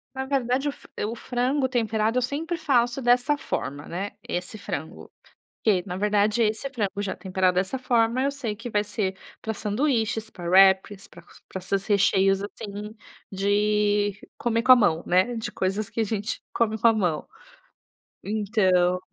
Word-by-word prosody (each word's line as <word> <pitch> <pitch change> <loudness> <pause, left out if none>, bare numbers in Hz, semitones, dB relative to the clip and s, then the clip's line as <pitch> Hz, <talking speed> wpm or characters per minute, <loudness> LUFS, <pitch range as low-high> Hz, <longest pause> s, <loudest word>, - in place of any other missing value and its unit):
Na 265 0 -3
verdade, 265 +1 0
o - - -2
fra - - -17
eh, - - -1
o 230 - -4
frango 255 +3 0
temperado 225 -1 0
eu - - -2
sempre 300 +7 -2
faço 265 -5 +1
dessa 245 +4 +3
forma, 145 - -4
né, 195 +4 -4 0.2
esse 180 +5 -4
frango. 155 -4 -6 0.5
Que 200 -5 +3
na 180 -2 -4
verdade, 210 +3 +2
esse 220 +4 0
frango 205 -6 -2
já 200 - -3
temperado 185 -1 0
dessa 190 +8 0
forma, 240 0 +2
eu 280 - +1
sei 235 -7 -4
que 230 +3 -7
vai 205 -1 +2
ser 195 -2 -2 0.2
pra 220 - -3
sanduíches, 220 0 -1
pra 175 -4 -7
wraps, 190 +1 +4
pra 170 - -15
pr - - -28 0.2
pra - - -5
esses 195 +1 -2
recheios, 195 -1 +3
assim, 210 +1 -7 0.3
de 205 +1 +1 0.2
comer 230 -1 0
com 255 - +8
a 255 - +9
mão, 170 -8 +2
né. 185 +7 +2
De 225 - -4
coisas 195 +3 -1
que - - -4
a - - +3
gente 210 0 -3
come 220 -2 +1
com 230 - +4
a - - +5
mão. 180 -8 -1 0.9
Então 190 -4 +2
210 Hz, 175 wpm, -25 LUFS, 195-240 Hz, 0.9 s, a